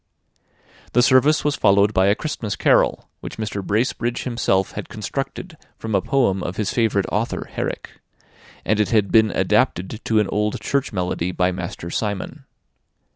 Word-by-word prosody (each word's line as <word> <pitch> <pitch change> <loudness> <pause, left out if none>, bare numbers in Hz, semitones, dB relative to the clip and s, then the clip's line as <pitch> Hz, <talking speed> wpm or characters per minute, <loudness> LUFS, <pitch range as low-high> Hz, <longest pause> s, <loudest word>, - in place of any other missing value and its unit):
The 125 - +4
service 140 +5 +4
was 145 -1 +1
followed 100 +1 +3
by 95 0 +3
a 100 - +4
Christmas 120 -7 -4
carol, - - +2
which - - -8
Mr. 105 -2 -4
Bracebridge 120 +3 -1
himself 115 -6 0
had - - -7
constructed 135 - -5 0.2
from 110 -1 -5
a - - +3
poem 120 -9 +1
of 90 - -4
his 105 -3 -1
favourite 110 -5 +1
author, 110 +3 -2
Herrick; - - -5 0.6
and 110 +1 +1
it 105 - +2
had 105 -4 +2
been 110 -1 +5
adapted 95 +2 0
to 110 -1 +2
an 105 - +1
old 105 0 -1
church 140 -1 -1
melody 90 -3 -2
by 90 0 +1
Master 90 -2 -6
Simon. 105 -3 -4
105 Hz, 160 wpm, -21 LUFS, 95-120 Hz, 0.6 s, been